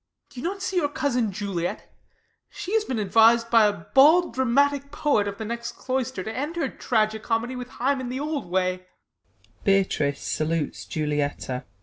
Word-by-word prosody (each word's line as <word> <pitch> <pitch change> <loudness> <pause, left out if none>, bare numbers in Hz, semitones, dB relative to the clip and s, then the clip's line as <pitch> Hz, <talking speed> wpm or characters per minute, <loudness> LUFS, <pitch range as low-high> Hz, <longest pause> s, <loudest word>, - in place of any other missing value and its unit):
Do 250 - -9
you - - -9
not 385 +2 -3
see 380 - -2
your 295 -5 +2
cousin 250 -7 0
Juliet? 190 -3 -4 0.6
She 380 - -6
has 445 -1 +3
been 255 - -3
advis'd 225 +3 +4
by 225 -2 +6
a - - +2 0.2
bald 315 +5 +6
dramatic 280 +3 +2
poet 280 -9 +1
Of 200 0 -5
the 220 - -5
next 235 +1 -4
cloister, 260 -6 -3
to 220 +2 -5
end 295 +6 -3
her 340 - -1
tragi 220 -2 0
comedy 230 +3 -2
With 250 0 -6
Hymen 260 0 -1
the 255 +1 -3
old 295 - -3
way. 185 0 -1
245 Hz, 150 wpm, -25 LUFS, 220-285 Hz, 0.6 s, by